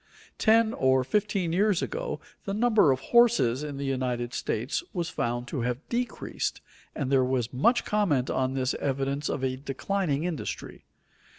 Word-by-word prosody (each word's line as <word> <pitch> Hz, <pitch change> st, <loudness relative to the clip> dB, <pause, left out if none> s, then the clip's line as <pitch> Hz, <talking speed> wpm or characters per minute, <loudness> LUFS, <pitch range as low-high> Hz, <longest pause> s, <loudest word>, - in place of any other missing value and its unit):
Ten 225 Hz, 0 st, +4 dB
or 130 Hz, 0 st, +3 dB
fifteen 195 Hz, +1 st, 0 dB
years 200 Hz, 0 st, +2 dB
ago -, -, -3 dB, 0.3 s
the 195 Hz, -, -2 dB
number 215 Hz, -, +4 dB
of 130 Hz, -, 0 dB
horses 235 Hz, -, +5 dB
in 145 Hz, -2 st, -5 dB
the 140 Hz, -, -3 dB
United 125 Hz, -3 st, -2 dB
States 120 Hz, -, -2 dB
was 170 Hz, -4 st, -2 dB
found 120 Hz, +1 st, -2 dB
to 135 Hz, -, -2 dB
have 125 Hz, +4 st, -3 dB
decreased, 245 Hz, +1 st, -2 dB, 0.4 s
and 140 Hz, -3 st, -2 dB
there 135 Hz, -1 st, +4 dB
was 125 Hz, -2 st, -1 dB
much 235 Hz, -, +3 dB
comment 165 Hz, -12 st, +1 dB
on 130 Hz, 0 st, 0 dB
this 130 Hz, 0 st, 0 dB
evidence 140 Hz, +1 st, -1 dB
of 135 Hz, -, -2 dB
a 130 Hz, 0 st, -1 dB
declining 145 Hz, +3 st, -2 dB
industry. 175 Hz, -4 st, -5 dB
140 Hz, 160 wpm, -27 LUFS, 130-205 Hz, 0.4 s, horses